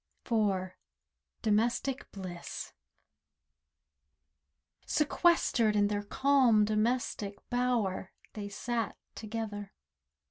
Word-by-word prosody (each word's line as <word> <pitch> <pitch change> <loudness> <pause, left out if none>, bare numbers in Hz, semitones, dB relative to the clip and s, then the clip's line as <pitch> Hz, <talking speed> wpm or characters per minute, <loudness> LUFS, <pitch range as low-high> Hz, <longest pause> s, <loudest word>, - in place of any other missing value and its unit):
DOMESTIC 235 +5 +1
BLISS 185 -3 -7 2.1
IV - - -22
Sequestered 300 -8 +3
in 205 -1 +3
their 205 -1 0
calm 245 -1 +4
domestic 215 -1 0 0.2
bower, 240 -7 0 0.2
They 205 -1 -5
sat 230 +1 -2 0.2
together. 215 -2 -5
215 Hz, 70 wpm, -31 LUFS, 205-245 Hz, 2.1 s, calm